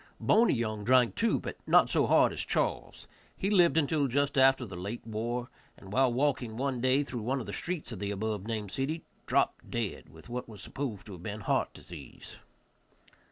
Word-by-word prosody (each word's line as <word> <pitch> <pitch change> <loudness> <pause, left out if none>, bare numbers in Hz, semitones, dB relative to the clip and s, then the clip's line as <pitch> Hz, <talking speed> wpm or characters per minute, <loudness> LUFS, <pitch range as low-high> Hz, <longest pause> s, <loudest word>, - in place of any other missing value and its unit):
Boney 230 - +4
Young 110 -3 -2
drank, 125 +1 +4
too, 230 0 +1
but - - -6
not - - +6
so - - +2
hard - - +4
as - - -1
Charles. - - -2 0.3
He 195 - -1
lived 175 -5 +5
until 150 -2 +2
just 140 +3 0
after 135 -1 +5
the 95 -5 -8
late 100 +7 -6
war, 120 +3 -3 0.3
and, 95 0 -11
while 130 0 +4
walking 125 -3 0
one 130 -2 -1
day 130 +3 +3
through 125 -4 -5
one 130 +5 -1
of 120 - -5
the 100 - -6
streets 175 -7 -3
of 110 - -6
the 100 - -3
above 105 0 -3
named 110 -4 -3
city, 145 - -2 0.2
dropped - - +1
dead, 115 -5 -3
with 80 +5 -15
what 120 0 -5
was 105 -2 -10
supposed 125 -8 -5
to 105 - -9
have 90 -3 -9
been 105 +3 -5
heart - - 0
disease. - - -11
120 Hz, 200 wpm, -30 LUFS, 105-140 Hz, 0.3 s, not